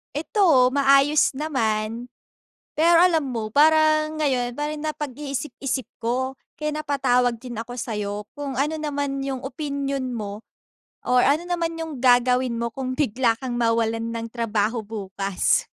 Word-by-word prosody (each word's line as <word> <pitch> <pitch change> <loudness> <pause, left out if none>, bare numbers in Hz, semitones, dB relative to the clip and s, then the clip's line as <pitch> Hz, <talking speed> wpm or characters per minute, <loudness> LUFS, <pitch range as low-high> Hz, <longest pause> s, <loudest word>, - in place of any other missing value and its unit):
Eto, 295 - +3
maayos 275 0 +4
naman. 230 -5 -1 0.7
Pero 335 +2 +5
alam 340 -4 +4
mo 230 -5 -3
parang 310 +3 +3
ngayon 250 -4 0
pa 295 +4 -3
rin 305 0 -5
napag-iisip-isip 275 -3 -4
ko, 260 +3 -2 0.2
kaya 305 0 -2
napatawag 250 -5 +1
din 245 -2 -8
ako 230 +2 -6
sa'yo, 210 -3 -4
kung 285 -2 -4
ano 290 +4 -1
naman 285 -3 -3
yung 270 -2 -3
opinyon 275 -1 -3
mo 210 -2 -6 0.6
or 250 0 +4
ano 295 +5 +2
naman 335 -2 -1
yung 310 -6 -5
gagawin 250 0 +4
mo 235 0 -1
kung 255 +1 -4
bigla 250 -4 +2
kang 255 -2 -3
mawalan 230 -1 0
ng 230 0 -4
trabaho 225 -1 0
bukas? 195 -2 -1
260 Hz, 135 wpm, -23 LUFS, 230-295 Hz, 0.7 s, Pero